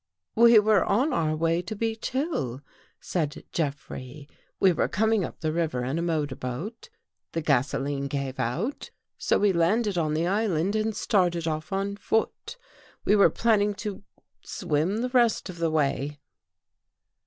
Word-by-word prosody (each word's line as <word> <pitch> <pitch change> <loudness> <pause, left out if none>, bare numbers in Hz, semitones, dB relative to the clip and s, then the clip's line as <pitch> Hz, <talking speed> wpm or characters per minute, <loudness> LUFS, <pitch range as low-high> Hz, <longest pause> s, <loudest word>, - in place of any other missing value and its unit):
" - - -61
"We 235 0 +7
were 210 -3 +5
on 255 +9 +1
our 155 -2 +1
way 165 +2 +1
to 210 +5 -6
Beech 225 +1 -2
Hill," 245 - -2 0.4
said 155 -5 -3
Jeff 145 -4 -2
rey. 130 +3 -8 0.3
"We 190 - +5
were - - +1
coming 220 -1 +1
up - - -7
the 155 -1 -1
river 160 -7 -1
in 135 +6 -1
a - - -1
motor 155 -5 -1
boat. 170 - -6 0.4
The 165 - -1
gasoline 140 0 0
gave 135 -1 -4
out, 170 - -2 0.3
so - - +2
we 205 -1 +3
landed 190 +3 +2
on 155 -2 0
the 165 +2 +1
island 195 -1 0
and 215 0 0
started 175 -6 +1
across 155 +1 -3
on 200 +1 -2
foot. 225 - -2 0.5
We 210 - +4
were 200 - +6
plan 225 -2 +2
ning 205 0 +1
to 205 -2 -5 0.2
— - - -56
swim 180 +6 -1
the 250 - -1
rest 240 -6 +2
of 170 - -12
the 165 -1 +1
way." 145 -1 0
170 Hz, 170 wpm, -26 LUFS, 150-215 Hz, 0.5 s, We